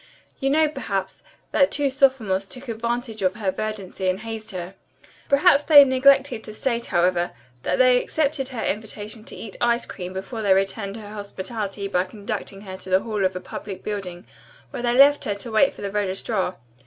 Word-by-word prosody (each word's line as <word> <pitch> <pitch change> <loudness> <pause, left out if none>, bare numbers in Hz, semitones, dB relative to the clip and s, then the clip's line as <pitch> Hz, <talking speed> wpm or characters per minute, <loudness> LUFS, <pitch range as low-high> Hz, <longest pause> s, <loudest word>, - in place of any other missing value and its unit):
You 270 - +1
know, 310 +2 +4
perhaps, 200 -10 -4 0.3
that 280 -1 +4
two 280 -2 0
sophomores 250 -8 +2
took 255 +5 -10
advantage 230 0 -3
of 185 0 +1
her 205 -3 -1
verdancy 195 -3 -3
and 185 +3 -1
hazed 225 -1 -6
her. 180 0 -6 0.6
Perhaps 285 +1 +5
they 290 -3 +9
neglected 265 -2 +4
to 215 - -7
state, 235 -1 -1
however, 175 0 +1 0.3
that - - 0
they 250 -1 +5
accepted 290 -3 -1
her 250 -4 -4
invitation 215 +1 -4
to - - -7
eat 210 -4 -9
ice 240 0 +2
cream 180 -1 -7
before 195 +5 -5
they 200 -3 +4
returned 195 +1 -1
her 210 -1 -9
hospitality 200 0 -5
by 180 -2 +1
conducting 200 0 -6
her 190 -2 -8
to 190 - -11
the 185 +1 +4
hall 215 -2 -2
of 185 0 +1
a - - -2
public 190 +1 -8
building 190 -4 -5 0.5
where - - -5
they 240 0 +1
left 285 +1 +6
her 205 - -1
to 215 +4 -7
wait 220 +6 +3
for - - -9
the 200 - -3
registrar. 195 -1 -1
215 Hz, 190 wpm, -23 LUFS, 195-255 Hz, 0.6 s, they